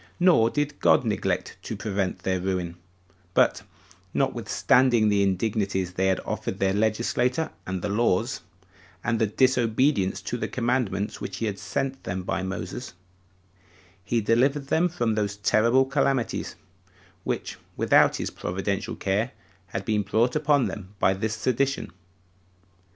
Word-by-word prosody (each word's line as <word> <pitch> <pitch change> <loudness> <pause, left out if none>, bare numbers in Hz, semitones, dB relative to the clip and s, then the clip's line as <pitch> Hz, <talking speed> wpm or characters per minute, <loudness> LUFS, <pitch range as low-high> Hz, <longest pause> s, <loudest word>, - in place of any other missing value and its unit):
Nor 170 -11 +5
did 145 +1 -2
God - - +4
neglect 95 -4 -1
to 110 - -5
prevent 100 -2 -2
their 95 -1 0
ruin; 90 -2 -2 0.6
but, - - +3 0.5
notwithstanding 120 -4 +3
the 100 -1 +3
indignities 95 -1 0
they 95 +1 +1
had 95 - +2
offered 95 - -4
their 95 -1 +1
legislator 120 +7 0 0.2
and 95 -1 -3
the - - 0
laws, 110 +2 +1 0.6
and 115 -1 0 0.2
disobedience 125 -5 +2
to 120 - -3
the - - -2
commandments 115 -5 -1
which 95 - -5
he 115 - -2
had 100 -2 -3
sent 135 0 -3
them 90 +1 -3
by 90 - -2
Moses, 95 +4 -5 1.1
he 115 +3 0
delivered 135 +6 +2
them 175 +3 +3
from 120 -10 0
those 105 -1 -1
terrible 115 +5 +3
calamities 135 -3 0 0.7
which, - - -3 0.2
without - - +4
his - - -3
providential 95 +2 -3
care, 105 +5 -1 0.3
had 95 +1 -5
been 105 -2 +1
brought 110 +5 +1
upon 145 -3 +3
them 100 0 -7
by 95 - +3
this 110 +3 -2
sedition. 130 +4 0
110 Hz, 135 wpm, -26 LUFS, 95-125 Hz, 1.1 s, Nor